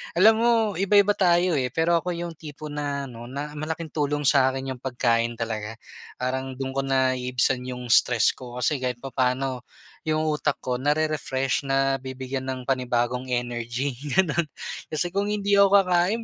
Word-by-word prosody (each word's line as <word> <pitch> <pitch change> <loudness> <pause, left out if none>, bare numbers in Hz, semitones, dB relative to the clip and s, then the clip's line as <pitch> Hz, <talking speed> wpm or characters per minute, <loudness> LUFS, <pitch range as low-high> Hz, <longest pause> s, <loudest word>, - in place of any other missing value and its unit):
Alam 205 +6 +7
mo, 235 +1 +3 0.3
iba-iba 200 +1 +4
tayo 180 -2 +3
eh, 125 - 0
pero 165 +5 +2
ako 180 +1 -3
yung 170 0 -4
tipo 150 -1 -9
na 145 -1 -3
ano, 120 -3 -9
na 140 +4 -5
malaking 155 +1 -5
tulong 145 -1 -1
sa'kin 135 -1 +2
yung 130 - -7
pagkain 120 -2 0
talaga. 110 -1 -4 0.4
Parang 130 +1 -3
do'n 130 0 -4
ko 135 - -2
naiibsan 130 -1 +1
yung 125 -1 -5
stress 120 -1 +5
ko, 125 -2 -11
kasi 130 +3 0
kahit 125 -1 -3
papaano 130 -1 -1 0.4
yung 155 0 +1
utak 150 -2 0
ko, 125 -1 -1
na-re-refresh, 145 -2 0
nabibigyan 135 -1 -1
ng 130 -1 -4
panibagong 125 -1 -1
energy, 120 +2 -2 0.2
gano'n. 170 -3 +2 0.4
Kasi 160 +3 -2
kung 200 +2 0
hindi 205 -1 +2
ako 200 0 +6
kakain, 185 +5 +1
135 Hz, 155 wpm, -25 LUFS, 125-155 Hz, 0.4 s, Alam